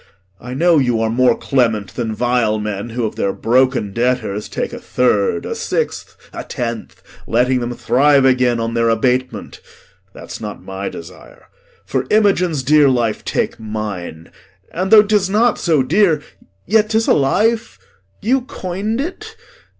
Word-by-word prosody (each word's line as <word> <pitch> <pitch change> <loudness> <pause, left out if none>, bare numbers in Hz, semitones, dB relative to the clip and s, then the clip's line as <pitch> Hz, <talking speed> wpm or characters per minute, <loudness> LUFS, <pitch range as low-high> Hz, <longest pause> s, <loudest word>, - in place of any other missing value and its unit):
I 125 +2 -7
know 170 +2 +4
you 125 -4 +1
are 110 0 0
more 125 +2 +3
clement 110 -8 0
than 115 -3 -3
vile 120 -2 +1
men, 105 +1 -4
Who 115 0 -2
of 110 - -5
their 100 - 0
broken 125 -2 +1
debtors 115 -4 -1
take - - -4
a - - -6
third, 100 -8 0
A - - -3
sixth, - - -3 0.2
a - - -6
tenth, 115 -2 -6 0.2
letting 125 +2 +2
them 120 0 -4
thrive 140 +2 +3
again 125 -2 +2
On 115 0 -2
their 115 0 +1
abatement; 125 +3 -1 0.5
that's - - -10
not 105 -2 -7
my 95 +1 -5
desire. 85 +2 -13 0.4
For - - -2
Imogen's 185 -9 +2
dear 145 +1 +5
life 120 -4 0
take - - -2
mine; 105 -7 -6 0.4
and 185 +3 -2
though 215 0 +8
'Tis 205 -2 +1
not 220 +3 +2
so 155 -6 +2
dear, 160 0 +2 0.4
yet 215 +2 +2
'tis 220 0 +1
a - - +5
life; 220 +11 +1 0.5
you 255 +5 +2
coin'd 210 -2 -4
it. 425 +9 -6
125 Hz, 155 wpm, -18 LUFS, 115-180 Hz, 0.5 s, though